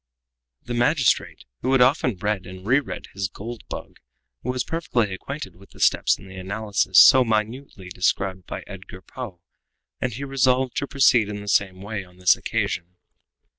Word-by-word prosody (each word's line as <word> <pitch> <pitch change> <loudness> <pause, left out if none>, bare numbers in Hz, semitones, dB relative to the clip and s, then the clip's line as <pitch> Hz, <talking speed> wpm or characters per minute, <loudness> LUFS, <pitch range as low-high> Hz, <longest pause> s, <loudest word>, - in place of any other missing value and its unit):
The 120 - -5
magistrate, 125 +3 +1 0.2
who 130 +2 +1
had 135 - +4
often 125 - +3
read 105 0 -2
and 95 +1 -10
re 130 +6 +4
read 140 - -7
his 95 0 -2
"Gold 115 +4 -8
Bug," - - -7 0.4
was 125 0 -2
perfectly 120 - -1
acquainted 135 - -7
with 100 +2 -18
the - - -17
steps - - +3
in - - -14
the 95 0 -11
analysis 100 0 -1
so 130 +6 +9
minutely 110 -2 -3
described 95 +1 -1
by - - -6
Edgar 95 -1 -11
Poe, 105 -9 -8 0.6
and 125 - -1
he 125 +5 -6
resolved 130 -2 +1
to 140 - -1
proceed 125 -6 +4
in 105 0 -5
the 100 - -10
same 95 -2 +1
way 105 -1 -4
on 90 -1 -19
this 90 0 +5
occasion. 90 +1 -3
105 Hz, 170 wpm, -23 LUFS, 95-130 Hz, 0.6 s, so